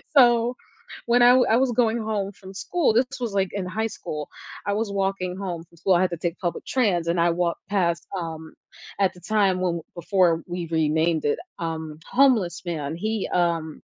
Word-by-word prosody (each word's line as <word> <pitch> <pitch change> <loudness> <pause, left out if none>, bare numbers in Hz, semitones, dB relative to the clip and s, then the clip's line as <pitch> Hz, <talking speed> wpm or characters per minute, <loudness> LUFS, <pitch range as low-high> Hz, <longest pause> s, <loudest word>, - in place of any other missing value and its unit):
So, 240 -2 +5 0.5
when 240 +1 +4
I 245 +1 +8
wa 255 0 +5
I 225 - +5
was 260 -1 +2
going 230 -1 +2
home 210 -3 -2
from 190 0 -12
school 315 - 0
this 245 +3 +3
was, 235 -4 -3
like, 195 -2 +1
in 200 -2 -3
high 220 +5 -2
school, 150 -8 -6 0.4
I 205 - +1
was 215 0 -1
walking 195 -2 -1
home 180 -4 -4
from 170 0 -23
school 185 +3 +2
I 175 - +3
had 185 -1 +1
to 170 - -3
take 170 +1 -3
public 175 -2 -3
trans 195 -10 +1
and 170 0 +1
I 170 0 +4
walked 170 0 -2
past, 170 -4 0
um, 160 -2 -6 0.5
at 195 -1 +2
the 180 - -15
time 195 -1 +1
when 170 -2 0
before 175 -1 +2
we 175 -1 -4
renamed 160 0 +1
it, 145 - +1 0.2
um, 160 -2 -4
homeless 235 -11 +3
man 160 -3 -3
he, 215 +4 -2
um 170 -3 0
185 Hz, 200 wpm, -24 LUFS, 170-215 Hz, 0.5 s, I